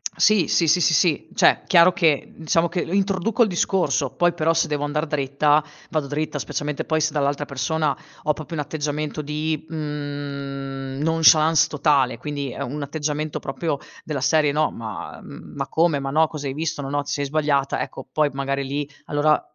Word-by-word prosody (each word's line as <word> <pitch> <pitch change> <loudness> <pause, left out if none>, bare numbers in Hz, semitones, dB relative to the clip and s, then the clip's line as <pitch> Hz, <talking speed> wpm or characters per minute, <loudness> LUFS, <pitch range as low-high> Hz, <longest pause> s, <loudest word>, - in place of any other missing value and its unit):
Sì. 215 -5 +4
Sì, 165 - +3
sì, 180 +3 +4
sì, 160 - +4
sì, 155 +1 +2
cioè, - - +4
chiaro 175 0 +6
che 160 -6 +1
diciamo 165 +2 +1
che 175 +1 -2
introduco 195 +5 +1
il - - +2
discorso, 175 -6 0
poi 175 -1 +3
però 165 0 +1
se 165 - +1
devo 145 -1 -2
andar 150 +2 -1
dritta 145 +1 +2 0.3
vado 155 -3 -1
dritta, 150 +1 -2
specialmente 150 +1 -3
poi 160 0 0
se 155 0 0
dall'altra 145 0 0
persona 150 +2 -1 0.3
ho 150 - +2
proprio 155 +2 -7
un 150 - -1
atteggiamento 150 0 -3
di, 150 +1 -3
mhmm, 140 -3 -5
nonchalance 160 0 +5
totale, 140 -5 +2
quindi 140 0 -4
è - - -7
un 140 +3 -4
atteggiamento 150 +1 -3
proprio 145 +1 -3 0.3
della 150 -3 -3
serie: 150 +1 +3
"No 155 +1 +2
ma 110 -3 -7
mhmm, - - -11
ma 140 0 -3
come? 160 -3 +2
Ma 135 - -3
no, 160 +2 +4
cosa 145 -2 -6
hai 135 - -3
visto? 155 -1 -3
No, 135 - -5
no 145 0 -1
ti 145 - -6
sei 145 0 -1
sbagliata." 140 -2 0
Ecco - - -6
poi 150 -1 +2
magari 140 0 -2
lì 145 +1 -3 0.2
allora 150 +1 +2
150 Hz, 185 wpm, -23 LUFS, 140-160 Hz, 0.3 s, chiaro